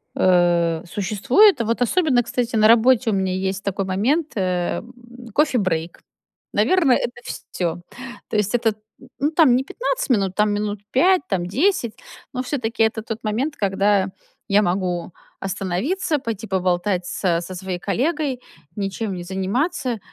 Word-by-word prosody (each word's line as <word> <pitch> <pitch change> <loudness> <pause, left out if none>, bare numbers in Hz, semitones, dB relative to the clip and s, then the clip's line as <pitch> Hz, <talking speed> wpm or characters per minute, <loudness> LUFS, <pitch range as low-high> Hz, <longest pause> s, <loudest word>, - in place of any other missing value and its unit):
Э, 175 -2 +3
существует 235 - +3
и - - +1
вот 230 +2 -1
особенно, 265 -1 +3
кстати, 240 0 -2
на 215 0 +6
работе 235 +1 +5
у - - 0
меня 190 -1 0
есть 190 +1 -2
такой 195 0 -2
момент, 260 - 0
э, 180 -3 -1
м, 240 - -13 0.4
coffee 285 -4 +3
break. 165 -2 -2 0.5
Наверно, 360 -8 +3
это 240 0 -2
ф - - -28 0.3
всё. 175 -1 -2 0.5
То - - -4
есть 210 +1 0
этот, 225 -3 +1 0.2
м, - - -15
ну, 295 +3 +1
там 305 -7 +5
не 260 - +1
15 - - -3
минут, 195 -6 +1
там 210 0 +2
минут 205 -1 -2
5, 365 +7 +4
там 180 -3 0
10, 250 - +1 0.4
но 255 0 -2
всё-таки. 235 -4 -1
Это 220 0 0
тот 225 0 -6
момент, 240 +8 -1
когда 195 0 +1 0.4
я 200 +1 +5
могу 180 -2 -1 0.3
остановиться, 250 - -1
пойти 225 -5 -5
поболтать 180 -1 0
с 170 -3 0
со 185 +1 -7
своей 185 -1 -4
коллегой, 265 - -1 0.3
ничем 200 +1 -3
не 175 - -6
заниматься. 240 - -1
210 Hz, 160 wpm, -22 LUFS, 190-255 Hz, 0.5 s, на